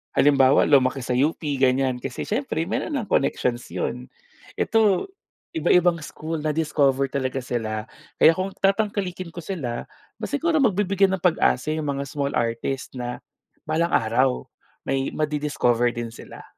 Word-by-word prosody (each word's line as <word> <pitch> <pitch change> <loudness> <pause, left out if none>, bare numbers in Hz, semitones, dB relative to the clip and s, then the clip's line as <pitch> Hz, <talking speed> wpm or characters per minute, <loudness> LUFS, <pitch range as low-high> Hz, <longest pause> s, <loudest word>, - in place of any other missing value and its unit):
halimbawa 140 -1 +5
lumaki 135 -1 +4
sa 125 - -2
UP 145 +1 0
ganiyan, 130 -1 +2
kasi 130 0 -5
siyempre 215 - -1
mayro'n 300 - -2
ng 225 - -4
connections 125 -3 +1
'yon, 60 - -3 0.5
ito 220 - +2 0.5
iba-ibang 175 +1 +3
school 160 +1 -5
na-discover 145 -3 +1
talaga 130 -1 -1
sila. 110 -3 -3 0.3
Kaya - - +9
kung 190 +1 -2
tatangkalikin 195 -3 0
ko - - -5
sila, 140 -10 -4
aba - - -11
siguro 320 +3 +1
mabibigyan 195 -3 +2
ng 180 - -20
pag-asa 155 -4 +2
'yong 155 -2 -3
mga 140 0 -2
small 140 -1 -2
artist 115 +3 -2
na 125 0 -4 0.5
balang 165 +2 +1
araw 125 +4 +2 0.4
may 135 0 0
ma-di-discover 145 -6 +1
din 120 -1 -3
sila. - - -11
145 Hz, 140 wpm, -24 LUFS, 130-180 Hz, 0.5 s, Kaya